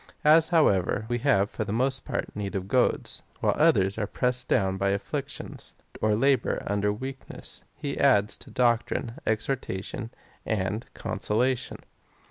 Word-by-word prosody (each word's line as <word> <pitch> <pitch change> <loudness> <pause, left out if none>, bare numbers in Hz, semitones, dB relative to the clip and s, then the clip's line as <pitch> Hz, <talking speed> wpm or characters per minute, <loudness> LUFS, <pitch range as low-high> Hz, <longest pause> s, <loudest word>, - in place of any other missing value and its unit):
As, 160 +1 +7
however, 110 - +3
we 120 0 0
have 110 -6 +2
for - - -3
the 105 - -5
most 130 +4 +1
part - - -4
need 100 0 -4
of 95 -1 -3
goads, 125 +4 +1 0.2
while - - +2
others 95 +3 +3
are 105 - -1
pressed 125 +3 +1
down 95 -5 +2
by 100 +1 0
afflictions, 100 0 -3 0.3
or 110 -1 +3
labour 135 +1 +2
under 100 0 +1
weakness, 130 +5 -7
he 145 -2 -4
adds 110 -7 +4
to - - -10
doctrine, 120 -1 0
exhortation 110 -1 -2 0.3
and 105 +2 -2
consola 110 +4 0
tion. - - -6
110 Hz, 145 wpm, -27 LUFS, 100-130 Hz, 0.3 s, As